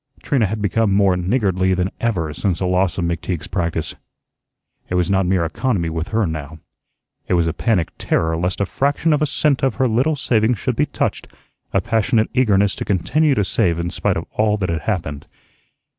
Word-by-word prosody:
Trina 120 -7 +2
had 105 +2 -4
become 100 +2 +1
more 100 -1 +3
niggardly 95 -1 +1
than 90 +1 -1
ever 90 -10 -1
since 95 0 -1
the 95 - -2
loss 90 -1 +1
of 90 - 0
McTeague's 85 0 -3
practice. 85 -4 -2 1.0
It 90 - -1
was 90 0 +1
not 95 -2 +2
mere 90 -2 +2
economy 85 - -1
with 80 +1 -3
her 110 -1 +1
now. 80 -2 -5 0.7
It - - +2
was 85 -1 +2
a 80 - -1
panic 100 -9 0
terror 80 0 0
lest 90 +2 -2
a 100 - +1
fraction 145 - +1
of 150 - +1
a 155 - +2
cent 140 -1 +1
of 135 -4 +1
her 130 -1 +2
little 130 +7 +1
savings 115 -3 +1
should - - -2
be - - +1
touched; - - -2 0.4
a - - +2
passionate 115 0 +1
eagerness 105 -6 +3
to - - -3
continue 140 - +1
to 105 - +1
save 90 -5 +1
in 85 0 -2
spite - - 0
of - - -4
all 105 0 +1
that 95 -4 -2
had 85 -2 -1
happened. 80 -9 -3
95 Hz, 200 wpm, -20 LUFS, 85-115 Hz, 1.0 s, more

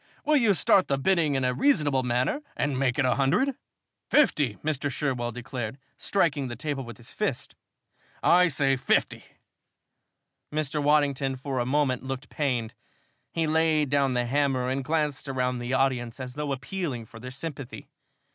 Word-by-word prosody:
Will 305 - +4
you 225 -7 +4
start 180 +4 +4
the 140 - +1
bidding 160 -1 +2
in 135 - 0
a 125 - +1
reasonable 145 - +2
manner 125 - 0 0.2
and 140 -2 0
make 130 -1 +1
it 145 - +2
a 125 - +3
hundred?" 180 - +2 0.6
"Fifty!" 150 - +3
Mr. 145 -2 0
Sherwell 125 -4 -2
declared, 120 0 -5 0.2
striking 150 -8 0
the 120 - -5
table 140 +2 -3
with 120 -1 -9
his 120 - -12
fist. - - -3 0.7
"I 180 +1 +6
say 135 -4 +2
fifty!" 130 - +1 1.3
Mr. 150 -1 -1
Waddington 145 -2 +2
for 135 0 -3
a 120 - -1
moment 135 -2 +1
looked 135 0 -6
pained. 125 -7 -1 0.6
He 165 -1 0
laid 155 -2 +2
down 140 -3 +2
the 120 0 +1
hammer 130 -1 +1
and 135 +1 -1
glanced 150 -1 -1
around 125 -1 -1
through 120 - -5
the 130 - -2
audience, 130 -2 0
as 125 -1 -6
though 150 0 -3
appealing 135 -2 -4
for 115 +1 -13
their 125 +2 -7
sympathy. 140 -1 -7
135 Hz, 165 wpm, -27 LUFS, 125-150 Hz, 1.3 s, I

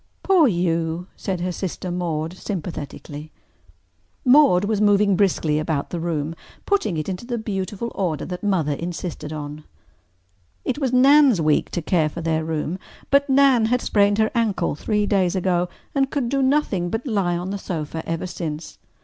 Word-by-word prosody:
"Poor 365 -6 +5
you!" 170 -3 0
said 185 -3 -3
her 180 +1 -1
sister 180 0 -4
Maude 165 -2 -2
sympathetically. 155 -5 -6 0.9
Maude 250 -8 +6
was 210 0 0
moving 205 -1 +4
briskly 165 -6 +1
about 155 -2 -2
the 175 - -3
room, 160 -2 -2 0.3
putting 220 - +1
it 155 - -3
into 185 +1 -4
the 240 0 -3
beautiful 205 +1 -4
order 170 -6 -2
that 180 -1 -6
Mother 185 -8 +1
insisted 165 -1 -5
on. 150 0 -6 1.0
It - - -1
was 265 -4 0
Nan's 270 - +6
week 155 -2 +2
to 175 - -3
care 155 -2 +2
for 170 - -7
their 160 -1 0
room, 160 +3 -3 0.3
but 280 +1 +4
Nan 265 -4 +5
had 245 +3 +2
sprained 205 -1 +2
her 220 0 +2
ankle 220 -7 0
three 210 +7 0
days 195 -3 +1
ago 180 -1 +1 0.2
and 270 -1 +1
could 270 -5 -1
do 275 +1 +1
nothing 260 -10 +1
but 225 +8 -3
lie 195 -8 0
on 180 +2 -4
the 200 - -3
sofa 160 -3 -4
ever 165 +2 -2
since. 160 -3 -6
185 Hz, 165 wpm, -22 LUFS, 165-220 Hz, 1.0 s, Maude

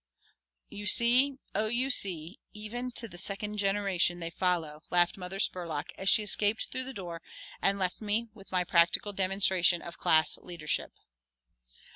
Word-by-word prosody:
"You 205 0 -7
see, 250 +6 +5 0.2
Oh, 215 +2 0
you 250 +4 0
see, 180 -5 +1
even 230 +4 -5
to 235 - -1
the 175 -4 -8
second 210 +2 -3
generation 195 -3 +1
they 165 -1 -4
follow," 165 -4 -2
laughed 175 0 +2
Mother 185 0 -7
Spurlock, 170 -7 -3
as 190 - -1
she 215 - +4
escaped 205 +1 +2
through 260 0 -1
the 265 - -5
door 170 -4 -7 0.4
and 195 0 +2
left 185 +1 -2
me 215 +2 -1
with 200 -3 -16
my 180 -1 +1
practical 170 +4 +2
demonstration 190 -2 +2
of 170 - -10
class 155 0 +3
leadership. 170 -4 -4
195 Hz, 155 wpm, -29 LUFS, 175-210 Hz, 0.4 s, see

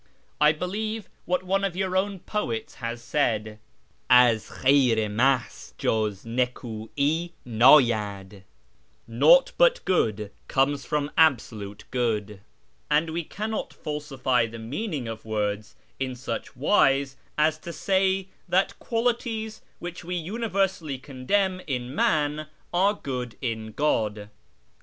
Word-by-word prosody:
I 150 0 +7
believe 210 +6 -3 0.2
what 180 +1 0
one 195 +2 0
of 195 -3 -1
your 185 0 -1
own 190 -1 0
poets 120 - -3
has 115 0 -4
said: 110 -6 -1 0.3
' - - -39
Az 120 -3 +5
Khayr 130 -4 +3
i 110 -1 +1
Mahz 125 +4 0
juz 105 -3 0
nik^'i 125 +6 -1 0.2
ndyacl,' 110 -6 +4 0.3
' - - -39
Nauglit 145 - +5
but - - +4
good 110 - 0 0.2
comes 140 0 +1
from 150 -1 -1
Absolute 110 -9 +1
Good,' 105 -5 -1 0.5
and 160 +2 +2
we 170 +1 -2
cannot 215 +6 -4
falsify 135 -5 -1
the 115 +1 -9
meaning 135 - -4
of 110 -1 -6
words 105 -1 -2 0.2
in 130 -1 -2
such 120 -2 -5
wise 135 -2 +3 0.2
as 155 +1 +2
to 170 - -7
say 190 +1 +1 0.2
that 185 +2 +1
qualities 225 -2 -2 0.2
which 175 0 -7
we 180 +2 -4
universally 190 - -1
condemn 185 +9 -1
in 125 -2 -3
man 150 0 +1 0.3
are 195 +4 +3
good 125 - -5
in 110 -3 -3
God. 105 -8 0
140 Hz, 125 wpm, -26 LUFS, 115-180 Hz, 0.5 s, I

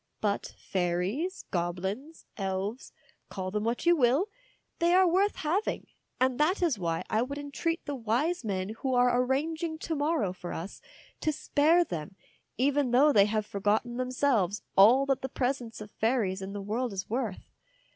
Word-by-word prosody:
But 205 -2 -2
fairies, 190 - -2
goblins, 190 - -3
elves, 195 +4 -3 0.4
call 185 -1 -4
them 210 +1 -1
what 235 +7 -1
you 345 0 +6
will, 280 - +3 0.5
they 345 +1 +4
are 375 0 +6
worth 385 +4 +2
having, 350 +8 -1 0.3
and 255 0 +1
that 355 +5 +2
is 300 - +1
why 165 -2 -1
I 220 - +1
would 280 +4 -3
entreat 290 +4 -3
the 290 - -3
wise 260 +8 0
men 190 -3 -2
who 265 -2 0
are 245 0 +4
arranging 315 +5 -1
to 325 0 -4
morrow 290 - 0
for 180 -1 -7
us 175 +5 -7 0.4
to 310 - +1
spare 310 +4 +3
them, 175 - -6 0.4
even 280 +1 +2
though 280 +5 +5
they 200 -1 +6
have 215 0 -1
forgotten 215 +4 0
them 255 0 -2
selves 230 -7 +1
all 240 +8 +7
that 270 -1 0
the 265 - -4
presence 245 -3 -2
of 210 -1 -9
fairies 220 -5 0
in 190 +1 -6
the 200 -1 -5
world 225 +3 -2
is 190 -1 -4
worth. 230 -4 -3
245 Hz, 170 wpm, -29 LUFS, 200-290 Hz, 0.5 s, all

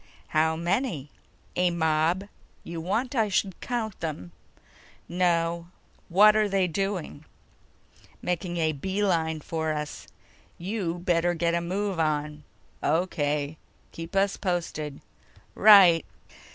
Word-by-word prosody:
"How 160 +1 +2
many?" 170 - -1 0.4
"A 180 0 +3
mob. 165 +3 +1 0.4
You 170 -1 -6
want 225 - -1
I 225 -5 +2
should 190 -1 -1
count 225 -5 -3
them?" 145 - -5 0.8
"No. 170 -1 0 0.4
What're 210 +3 +5
they 195 -1 +2
doing?" 180 -4 -3 1.0
"Making 175 0 -2
a 160 -1 +2
beeline 165 -1 -1
for 160 0 -2
us. 150 -1 -5 0.5
You 180 -2 -3
better 175 0 +1
get 170 0 0
a 170 - +1
move 190 +1 -2
on." 150 -1 -1 0.4
"O.K. 150 -2 0 0.3
Keep 165 +3 -8
us 195 0 +2
posted." 165 -6 -3 0.5
"Right." 195 -6 +7
170 Hz, 110 wpm, -27 LUFS, 160-195 Hz, 1.0 s, Right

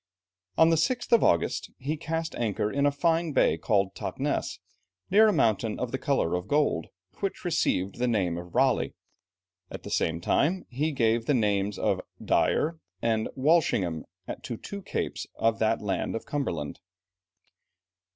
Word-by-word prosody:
On 160 +1 +6
the 165 - +3
6th 240 +11 0
of 235 - +6
August, 85 - +1
he 145 +4 -2
cast 165 +1 -3
anchor 105 -2 -1
in 140 +1 +2
a - - +3
fine 165 +2 +1
bay 130 - +4
called 100 -3 +1
Tottness; - - -2 0.5
near 215 +3 +7
a - - +4
mountain 110 - +1
of 125 -2 -2
the 130 - -2
colour 140 - +1
of 90 +2 -2
gold, 145 - +1 0.3
which 195 -1 -3
received 100 - 0
the 125 - +1
name 95 -8 +1
of 90 0 -8
Raleigh, - - +2 0.7
at - - -8
the - - -7
same 80 0 0
time, 165 - +1
he 150 +6 0
gave 115 -3 +1
the 145 - +3
names 105 -3 +1
of - - 0 0.2
Dyer 160 +1 +1 0.2
and 110 -1 0
Walsingham 130 - +2 0.4
to 120 - -5
two 200 - -7
capes - - -3
of 115 0 +1
that 110 0 +1
land 100 +2 -1
of 115 - -5
Cumberland. 85 - -3
120 Hz, 160 wpm, -27 LUFS, 100-160 Hz, 0.7 s, near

